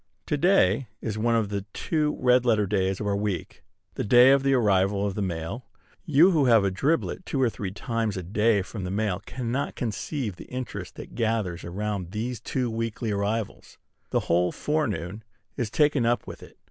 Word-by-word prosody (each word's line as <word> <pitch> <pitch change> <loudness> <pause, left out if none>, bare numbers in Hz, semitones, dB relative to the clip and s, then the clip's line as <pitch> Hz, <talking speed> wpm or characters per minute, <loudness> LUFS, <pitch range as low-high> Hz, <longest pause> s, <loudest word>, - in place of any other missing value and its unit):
To - - 0
day 140 - +3
is 110 -2 -4
one 115 +1 +2
of 110 -3 +1
the 100 -1 -2
two 150 -2 -1
red 125 0 +4
letter 110 -4 +3
days 95 -1 0
of 105 - -3
our 100 -1 +1
week, 100 -3 -3 0.3
the - - -3
day 125 +4 +7
of 140 0 +5
the 135 0 +3
arrival 100 -3 +2
of 100 - -1
the 105 - -3
mail. 85 +6 -4 0.4
You 160 +5 +6
who 155 -6 +3
have 115 -5 +5
a 100 - +1
driblet 155 - 0
two 140 - -3
or 125 -3 +3
three 100 -3 -4
times 110 +1 -2
a 95 - -4
day 105 +2 +2
from 100 +1 -7
the 90 - -3
mail 100 -1 -1
cannot 125 +2 -3
conceive 115 - -3
the - - -10
interest 125 -2 -6
that - - -10
gathers 110 -7 -1
around 100 0 -3
these 115 +2 -3
two 125 +1 -2
weekly 115 0 -3
arrivals. 100 +2 -3 0.3
The - - +1
whole 90 +1 +1
forenoon 110 - -2 0.3
is 120 -4 -2
taken 145 +1 +2
up 120 +1 +1
with - - -9
it. - - -14
110 Hz, 195 wpm, -26 LUFS, 100-125 Hz, 0.4 s, day